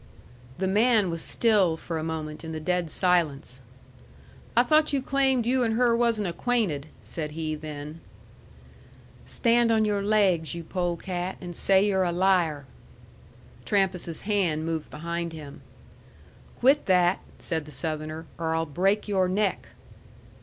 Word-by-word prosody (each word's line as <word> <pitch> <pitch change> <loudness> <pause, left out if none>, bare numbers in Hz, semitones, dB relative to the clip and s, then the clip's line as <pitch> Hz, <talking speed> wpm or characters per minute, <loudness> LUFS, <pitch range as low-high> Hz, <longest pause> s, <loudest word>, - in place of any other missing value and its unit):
The 190 - -1
man 210 -1 +3
was 165 -1 -4
still 200 -8 +2
for 165 0 -4
a - - -4
moment 155 -1 -5
in 160 0 -6
the 160 - -4
dead 180 +1 -1
silence. 155 -7 0 1.0
"I 240 - +7
thought 305 +4 +3
you 280 - +1
claimed 265 -2 +1
you 255 +2 +2
and 225 -2 +1
her 240 0 +3
wasn't 230 -4 +1
acquainted," 170 - -1 0.2
said 150 -2 -5
he 155 0 -3
then. 150 +1 -7 1.2
"Stand 235 -1 +2
on 220 -1 +3
your 205 -1 0
laigs, 190 -7 +2
you 170 - -6
polecat, 175 +1 -3
and 175 -2 -7
say 195 +3 +4
you're 195 -2 +1
a 175 - 0
liar!" 175 -5 +2 1.0
Trampas's 190 -5 0
hand 180 -7 0
moved 160 -2 -3
behind 170 +2 -4
him. 150 -3 -10 0.9
"Quit 275 +4 +3
that," 180 -1 +3 0.2
said 160 -3 -3
the 150 - -11
Southerner, 155 +2 -4
"or 160 -1 -1
I'll 165 0 0
break 195 +8 0
your 190 -3 +2
neck!" 200 +1 0
180 Hz, 145 wpm, -26 LUFS, 160-210 Hz, 1.2 s, I